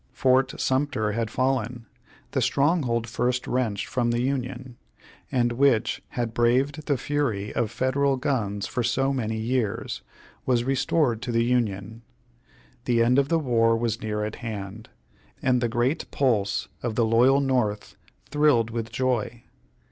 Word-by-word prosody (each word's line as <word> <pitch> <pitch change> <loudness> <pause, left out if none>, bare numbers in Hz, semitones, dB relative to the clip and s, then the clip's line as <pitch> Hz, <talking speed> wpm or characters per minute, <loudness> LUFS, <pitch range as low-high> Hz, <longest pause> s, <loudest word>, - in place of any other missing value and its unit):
Fort 130 0 +2
Sumter 130 -6 0
had 115 +1 -2
fallen; 125 -2 -1 0.5
the - - 0
stronghold 140 -6 +1
first 125 +2 -1
wrenched 115 -6 -1
from 120 -2 -1
the 120 0 0
Union; 130 -2 -3 0.6
and 120 -2 +2
which 125 -2 +2 0.2
had 120 -2 -1
braved 130 +6 +1
the 140 -3 +2
fury 120 -9 -2
of 115 -3 0
Federal 135 +3 +1
guns 105 -7 -1
for 125 - -2
so 135 +4 +1
many 110 -4 -2
years, 115 0 -2 0.4
was 120 -2 +1
restored 135 -2 +1
to 125 - -3
the 115 0 +2
Union; 115 -3 -1 0.8
the 120 -2 +3
end 125 +3 +4
of 140 0 +1
the 165 - +3
war 115 -6 +2
was 115 -1 -2
near 105 -1 -2
at 105 - -6
hand, 110 -1 -7 0.5
and 125 -2 +2
the 120 - +1
great 120 +6 0
pulse 110 -8 0
of 120 -3 -3
the 115 - +3
loyal 125 +5 +4
North 125 -7 -1 0.4
thrilled 145 -7 +3
with 115 -1 -4
joy. 120 -1 -1
120 Hz, 150 wpm, -25 LUFS, 115-130 Hz, 0.8 s, end